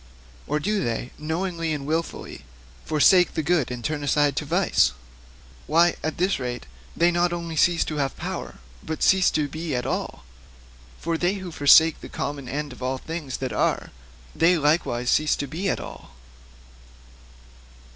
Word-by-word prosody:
Or 150 +1 0
do 205 +4 0
they 120 +2 -3
knowingly 165 +1 -2
and 145 -2 -4
wilfully 160 - -4 0.4
forsake 175 +4 +4
the 160 - 0
good 165 -3 +1
and 120 -2 -6
turn 155 -2 -2
aside 145 0 +2
to 150 - -1
vice? 175 - +2 0.7
Why, 170 +2 +4
at 155 - -3
this 185 -1 +1
rate, 125 - -4 0.3
they 170 +1 +4
not 175 0 +1
only 170 -1 -4
cease 170 +2 +3
to 155 - -4
have 135 -2 -1
power, - - -5 0.3
but 160 0 -4
cease 190 -1 +5
to 150 -2 0
be 155 0 -4
at 125 0 -2
all. 135 - -3 0.7
For 165 0 -2
they 180 +3 +1
who 190 -3 -7
forsake 160 +1 +5
the - - -9
common 140 -3 -5
end 145 -1 -4
of 125 - -15
all 130 +1 -1
things 155 -2 -5
that 130 -1 -4
are, - - 0 0.4
they 175 +2 +4
likewise 150 -5 +1
also - - +5
cease 155 0 +1
to 140 - -3
be 165 +8 -3
at - - -1
all. - - -10
155 Hz, 170 wpm, -24 LUFS, 140-170 Hz, 0.7 s, cease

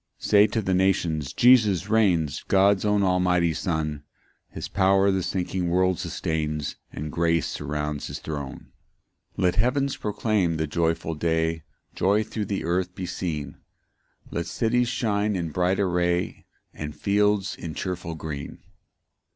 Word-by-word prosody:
2 - - -8
Say 105 0 +6
to 110 +1 -2
the 95 - 0
nations, 85 -6 +1
Jesus 105 -7 +4
reigns, 95 -9 +2
God's 95 0 +4
own 105 -1 +2
almighty 90 -2 +2
Son; 75 -3 -2 0.5
His - - -6
power 95 0 +3
the 95 -1 0
sinking 90 0 -2
world 90 0 +2
sustains, 75 -2 -2 0.2
And 75 +3 -5
grace 85 0 +1
surrounds 75 0 -3
his - - -5
throne. 70 -4 -7 0.6
3 - - -2
Let 90 -1 +3
heaven 130 +5 +2
proclaim 105 -8 0
the 80 - 0
joyful 80 +1 -1
day, 80 0 0 0.3
Joy 100 +3 +2
thro' 105 0 -4
the 100 0 -3
earth 90 +2 -1
be 95 - -4
seen; 80 -5 -4 0.7
Let 85 - -3
cities 120 +1 +1
shine 105 -3 0
in 85 -3 -2
bright 90 +4 +1
array, 90 -2 0 0.3
And 75 -1 -6
fields 100 -1 +1
in 80 -2 -7
cheerful 90 -3 -4
green. 75 -3 -6
90 Hz, 145 wpm, -25 LUFS, 80-100 Hz, 0.7 s, Say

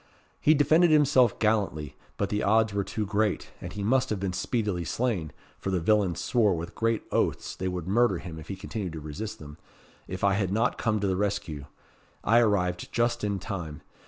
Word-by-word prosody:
He 155 - +5
defended 155 +4 +5
himself 140 -6 +4
gallantly, 100 - 0 0.2
but - - -1
the 105 0 -1
odds 110 0 +3
were 100 0 0
too 105 +2 -3
great, 105 +1 0
and - - -6
he 105 - -5
must 130 +5 +2
have 105 - -1
been 95 -1 -2
speedily 100 -2 -1
slain 95 - -1 0.3
for - - -3
the 95 -2 +1
villains 95 0 +2
swore 110 -6 +2
with 85 +1 -6
great 115 0 0
oaths - - 0
they 95 - -3
would 90 -2 -4
murder 120 +5 +3
him 80 -3 -8
if 80 - -11
he 100 - -4
continued 95 -1 -5
to 80 - -5
resist 75 +9 -6
them 75 0 -11 0.5
if 95 +1 -6
I 100 -1 +4
had 100 -2 0
not 115 +4 +1
come 110 -2 +1
to 100 - +1
the 95 - +1
rescue. 90 -7 -2 0.6
I 115 +2 +5
arrived 90 -6 +1
just 120 -1 0
in 100 -1 0
time. 85 -7 -6
100 Hz, 200 wpm, -27 LUFS, 90-115 Hz, 0.6 s, He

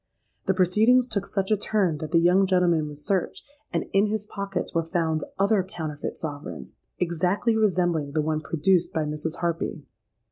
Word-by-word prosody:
The 190 - +2
proceedings 220 +7 +4
took 200 -4 -2
such 195 0 -2
a - - +6
turn 195 -6 0
that 155 - -5
the 170 - +4
young 180 +3 +4
gentleman 175 -4 +2
was 150 0 -8
searched; 190 -3 -1 0.2
and - - -1
in 200 +2 +4
his 210 0 -2
pockets 200 -3 -4
were 165 - +2
found 165 -2 -1
other 200 +1 +3
counterfeit 155 -5 -5
sovereigns, 145 -2 -6 0.2
exactly 180 +6 +1
resembling 175 -9 +1
the 155 - +2
one 155 0 -1
produced 170 +4 +1
by 160 - 0
Mrs. 150 +2 -3
Harpy. 170 -2 -2
180 Hz, 170 wpm, -25 LUFS, 160-195 Hz, 0.2 s, a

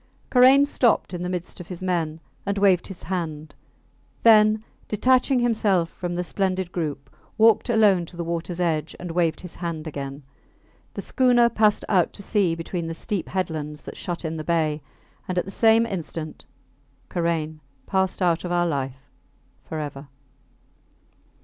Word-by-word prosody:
Karain 260 +3 +7
stopped 240 -8 +1
in 175 - -4
the 180 - -2
midst 180 -1 -5
of 175 - -9
his 180 0 -6
men 165 -4 -1 0.2
and 200 0 -2
waved 195 -3 +3
his 185 -8 -8
hand; 155 -3 -4 0.7
then, 215 -1 +6 0.2
detaching 255 +5 +3
himself 210 -8 +2
from 175 -1 -4
the 180 - -1
splendid 185 -1 -1
group, 150 -6 -4 0.2
walked 225 +2 +4
alone 210 -6 +4
to 175 - -13
the 170 - -2
waters 170 +1 -4
edge 160 -3 -1
and 175 -1 -5
waved 165 -2 0
his 180 - -9
hand 170 -3 -4
again. 140 -2 -6 0.7
The - - -4
schooner 245 -3 +4
passed 215 -2 +2
out 185 -5 +2
to 200 - -6
sea 195 -5 +1
between 165 0 -4
the 165 - -4
steep 200 +1 -3
headlands 155 -5 -3
that - - -8
shut 175 -1 -5
in 160 0 -3
the 155 - -4
bay, 155 -2 0 0.5
and 185 - -3
at 180 - +1
the 195 - -7
same 225 +2 +4
instant 165 -6 -6 0.6
Karain 165 -3 -2 0.3
passed 190 -1 0
out 170 -2 +2
of 175 - -4
our 175 0 +2
life 135 -4 -3 0.6
forever. 145 -3 -6
175 Hz, 160 wpm, -24 LUFS, 160-205 Hz, 0.7 s, Karain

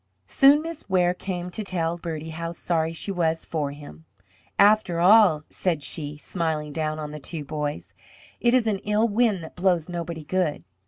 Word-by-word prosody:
Soon 275 - +5
Miss 330 -7 -8
Ware 180 -1 +3
came 180 -1 -5
to 215 - -3
tell 170 -4 -1
Bertie 160 -2 -6
how 165 +1 -5
sorry 165 -1 -1
she 165 +4 -3
was 165 -3 0
for 150 -3 -2
him. 140 - -11 0.5
"After 205 -4 +4
all," 185 -4 +6
said 165 -6 -2
she, 145 +1 -3
smiling 155 -2 -3
down 155 -1 -2
on 150 -1 -5
the 150 - -7
two 150 +1 -6
boys, 150 0 -4 0.5
"it 240 +1 +3
is 250 -3 +3
an 210 -3 0
ill 210 +3 +1
wind 215 -4 +1
that 160 - -10
blows 180 -3 +1
nobody 170 -2 -5
good. 175 -1 -1
170 Hz, 175 wpm, -25 LUFS, 155-195 Hz, 0.5 s, all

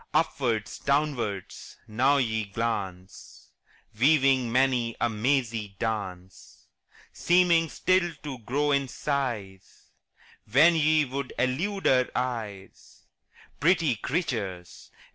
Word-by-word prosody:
Upwards, 120 -9 0
downwards, 135 -10 -2
now 130 +6 +2
ye 110 -4 0
glance, 100 -4 -5 0.5
Weaving 135 -3 +3
many 125 -2 +1
a 120 - +2
mazy 110 -3 -1
dance; 95 -5 -6 0.5
Seeming 175 -2 +3
still 185 +1 +1
to 140 -4 -6
grow 145 +6 -1
in 140 -1 +1
size 120 -10 -4 0.6
When 150 +8 +6
ye 155 -1 +3
would 135 0 -5
elude 175 +11 -1
our 125 -1 +4
eyes 110 -6 -5 0.6
Pretty 165 -4 +3
creatures! 105 - -4
125 Hz, 95 wpm, -27 LUFS, 110-145 Hz, 0.6 s, When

